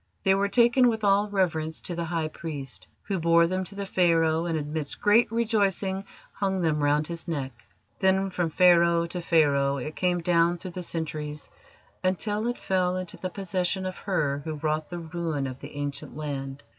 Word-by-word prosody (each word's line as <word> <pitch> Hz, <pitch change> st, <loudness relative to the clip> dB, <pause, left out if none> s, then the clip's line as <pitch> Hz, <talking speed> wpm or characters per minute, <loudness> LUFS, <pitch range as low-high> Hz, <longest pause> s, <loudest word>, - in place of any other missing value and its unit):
They 190 Hz, -, +4 dB
were 200 Hz, +1 st, +2 dB
taken 240 Hz, +4 st, +5 dB
with 220 Hz, -2 st, -2 dB
all 200 Hz, +1 st, +3 dB
reverence 165 Hz, -5 st, 0 dB
to 175 Hz, -, -5 dB
the 170 Hz, 0 st, -3 dB
High 160 Hz, -1 st, -2 dB
Priest, 145 Hz, -5 st, -7 dB, 0.2 s
who 195 Hz, -2 st, -2 dB
bore 170 Hz, 0 st, +5 dB
them 185 Hz, +2 st, -1 dB
to 200 Hz, -, -10 dB
the 200 Hz, 0 st, -4 dB
Pharaoh, 165 Hz, -3 st, +2 dB
and, 165 Hz, -2 st, 0 dB
amidst 150 Hz, 0 st, -3 dB
great 215 Hz, +2 st, +4 dB
rejoicing, 200 Hz, -4 st, 0 dB, 0.3 s
hung 190 Hz, -2 st, -1 dB
them 155 Hz, -3 st, +1 dB
round 145 Hz, +1 st, +2 dB
his 170 Hz, +1 st, -5 dB
neck. 140 Hz, -5 st, -2 dB, 0.5 s
Then 190 Hz, 0 st, +2 dB
from 175 Hz, -2 st, -1 dB
Pharaoh 170 Hz, 0 st, +5 dB
to 175 Hz, +1 st, -5 dB
Pharaoh 140 Hz, -5 st, +3 dB
it 150 Hz, +4 st, -5 dB
came 180 Hz, -1 st, +1 dB
down 170 Hz, 0 st, +2 dB
through 185 Hz, +1 st, -7 dB
the 180 Hz, -, -6 dB
centuries 155 Hz, -3 st, -5 dB, 0.5 s
until 205 Hz, +4 st, 0 dB
it 245 Hz, -, -2 dB
fell 185 Hz, -1 st, 0 dB
into 185 Hz, -1 st, -5 dB
the 185 Hz, -, -4 dB
possession 185 Hz, 0 st, -2 dB
of 185 Hz, -1 st, -4 dB
her 145 Hz, -8 st, -1 dB
who 155 Hz, 0 st, -4 dB
wrought 155 Hz, +1 st, -2 dB
the 175 Hz, -, -5 dB
ruin 165 Hz, -4 st, -3 dB
of 130 Hz, -1 st, -6 dB
the 145 Hz, +1 st, -10 dB
Ancient 145 Hz, -2 st, -5 dB
Land. 135 Hz, -3 st, -5 dB
170 Hz, 185 wpm, -27 LUFS, 155-190 Hz, 0.5 s, taken